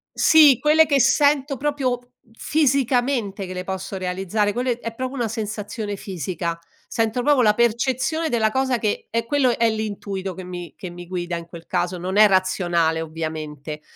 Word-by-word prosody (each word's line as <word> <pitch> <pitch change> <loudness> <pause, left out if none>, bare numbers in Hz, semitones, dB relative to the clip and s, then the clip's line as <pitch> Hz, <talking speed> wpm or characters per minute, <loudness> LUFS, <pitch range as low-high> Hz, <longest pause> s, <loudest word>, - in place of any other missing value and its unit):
Sì, 300 -6 +7
quelle 310 +1 +5
che 280 -2 +2
sento 285 +2 +3
proprio 275 -3 -1
f 245 - -27 0.3
fisicamente 250 -7 0
che 185 - -7
le 180 0 -4
posso 190 +1 -5
realizzare, 190 +3 -1
quelle 245 +1 -1
è 230 -1 -5
proprio 255 +3 -4
una 240 -4 -1
sensazione 210 -1 -4
fisica. 170 -2 -4 0.3
Sento 225 +1 -1
proprio 290 -3 +4
la 210 -3 +5
percezione 260 +7 0
della 225 -5 +1
cosa 260 0 +1
che 215 -2 -2
è 230 0 -1
quello 255 -1 +2
è 230 -1 +3
l'intuito 200 -3 -4
che 185 - -8
mi 175 -2 -8
che 185 - -7
mi 175 0 -10
guida 175 -1 -3
in 170 - -8
quel 170 -1 -11
caso, 180 0 -1
non 185 +3 -3
è 215 0 +8
razionale, 175 -4 +1
ovviamente 155 -2 -6
215 Hz, 170 wpm, -22 LUFS, 180-255 Hz, 0.3 s, è